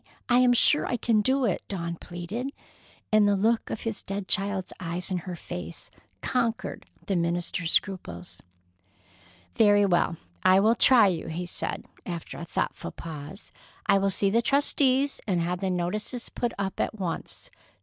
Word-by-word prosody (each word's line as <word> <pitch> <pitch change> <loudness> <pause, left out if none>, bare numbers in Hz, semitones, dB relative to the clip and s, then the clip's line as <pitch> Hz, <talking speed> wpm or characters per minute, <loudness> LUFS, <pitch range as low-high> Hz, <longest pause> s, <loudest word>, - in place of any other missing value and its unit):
I 245 0 +5
am 250 -1 +5
sure 295 +4 +5
I 245 - 0
can 225 -3 +2
do 260 +4 +2
it," 200 - 0
Dawn 170 -3 -3
pleaded, 175 +10 -5 0.6
and 215 -1 +5
the 205 - +3
look 220 +4 +1
of - - -4
his 225 -2 -2
dead 195 0 -5
child's 195 -2 -1
eyes 180 +2 -3
in 180 - 0
her 180 - -4
face - - -7 0.3
conquered 235 -3 -1 0.2
the 195 - -1
minister's 170 0 0
scruples. 90 - 0 1.1
"Very 205 -1 +5
well, 175 -3 +2 0.2
I 185 +1 +6
will 220 +3 +5
try 235 -1 +6
you," 175 -5 0
he 165 +2 -4
said, 175 - -5 0.2
after 170 -3 -6
a 170 - -6
thoughtful - - -3
pause. 155 +3 -9 0.3
"I 200 -2 +4
will 195 0 +2
see 195 0 +1
the 230 +3 +3
trustees 275 +1 +2
and 185 -4 +1
have 175 +1 -1
the 190 0 -1
notices 210 +7 -2
put 240 -1 -2
up 195 -1 -3
at - - -1
once. 180 -6 -5
195 Hz, 165 wpm, -27 LUFS, 175-225 Hz, 1.1 s, I